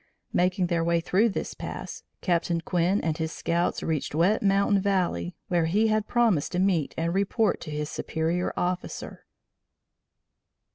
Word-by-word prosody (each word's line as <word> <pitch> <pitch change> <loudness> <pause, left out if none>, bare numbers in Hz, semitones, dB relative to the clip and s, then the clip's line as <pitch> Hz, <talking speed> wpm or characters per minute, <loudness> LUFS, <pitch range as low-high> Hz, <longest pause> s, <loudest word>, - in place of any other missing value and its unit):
Making 180 +1 +2
their 170 -1 0
way 170 0 +2
through 195 +7 +2
this 195 - -4
pass, - - -7 0.2
Captain 170 -1 +1
Quinn 180 +4 +1
and 160 -2 -1
his 160 0 -2
scouts 170 +1 -1
reached 155 -2 -2
Wet 180 +7 +3
Mountain 200 0 +3
Valley, 180 - 0
where 175 -2 +2
he 210 +7 +2
had 215 -1 +1
promised 225 -12 +2
to 180 - 0
meet 185 -6 +1
and 165 +1 0
report 200 +2 +1
to - - -7
his 150 0 -3
superior 165 +4 -1
officer. 180 0 -3
175 Hz, 150 wpm, -26 LUFS, 165-195 Hz, 0.2 s, Wet